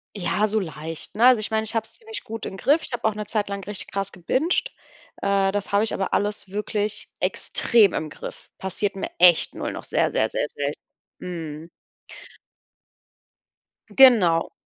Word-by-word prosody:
Ja, 205 +2 0
so 215 +1 +1
leicht, 160 0 -6
ne? 230 - +4
Also, 250 -3 +7
ich 215 - -4
meine, 220 0 +1
ich 220 +1 -4
hab's 225 0 -2
ziemlich 445 -1 -9
gut 225 0 -6
im 190 - -6
Griff. 295 +9 +3
Ich - - -7
habe 240 - -4
auch 220 - +2
'ne 210 0 -5
Zeit 210 -1 -2
lang 200 -1 -4
richtig 205 -1 -4
krass 195 0 -3
gebingt. 310 - 0 0.5
Äh, 195 -1 +2
das 205 -1 -3
habe 200 +1 +3
ich 225 - -1
aber 195 - -2
alles 205 0 -1
wirklich 210 +1 -3
extrem 215 -6 +3
im 155 -1 -3
Griff. - - -9
Passiert 195 +1 -3
mir 195 - -4
echt 175 -2 +6
nur - - -3
noch, - - -7
sehr, - - 0
sehr, 110 - +1
sehr, - - -1
selt 145 0 -2 0.4
Mhm. 165 -2 -7 2.2
Genau, 210 -11 +5
205 Hz, 175 wpm, -24 LUFS, 180-220 Hz, 2.2 s, Also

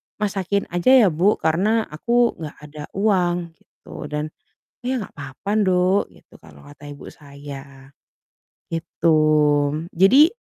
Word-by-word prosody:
masakin 200 -1 -1
aja 175 +10 +4
ya 190 - +4
buk, 180 +6 +1
karena 200 +8 +2
aku 235 +10 +1
nggak 155 -2 -7 0.2
ada 150 -1 -8
uang" 180 -4 0
gitu, 150 - -11
dan 150 +1 -4 0.5
"Iya, 255 0 -1
nggak - - -30
apa-apa 140 +7 -7
nduk," 185 -1 +2
gitu - - -20
kalau 75 -3 -17
kata 145 0 -15
ibu 140 - -11
saya, 140 -2 -12 0.8
gitu. 165 0 -1 0.8
Jadi 255 - +5
175 Hz, 125 wpm, -21 LUFS, 150-200 Hz, 0.8 s, Jadi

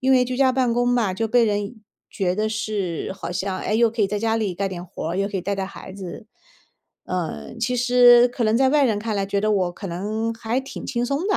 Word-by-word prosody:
因 265 +1 +3
为 250 -1 +5
居 250 0 -3
家 260 -1 +4
办 250 -2 +1
公 245 0 +1
嘛， 235 -6 +2
就 225 +4 -1
被 240 +1 +4
人 205 +1 -1 0.3
觉 185 -2 -1
得 215 +2 0
是， 205 -6 -3
好 195 -3 -6
像， 190 +1 -2
诶， 215 - -1
又 235 0 +4
可 225 -2 -1
以 - - +4
在 210 - -2
家 225 +1 +1
里 205 -5 -1
干 195 +2 -1
点 175 -1 -6
活 165 -2 -5
儿， 180 - -3
又 195 - +1
可 200 - -4
以 - - -1
带 200 +2 -1
带 195 - -2
孩 190 - -10
子。 195 +2 -8 0.8
呃， 115 - -4
其 250 - 0
实 245 0 +6
可 245 -1 -2
能 215 +1 +3
在 265 0 +4
外 295 0 +4
人 215 -4 +1
看 220 0 -3
来 195 - -1
觉 200 0 -1
得 215 0 +1
我 185 -3 +1
可 195 - -8
能 215 +6 -2
还 225 +2 -2
挺 270 - -8
轻 240 -1 -1
松 280 +8 -1
的， 405 - +2
215 Hz, 280 characters per minute, -23 LUFS, 195-245 Hz, 0.8 s, 实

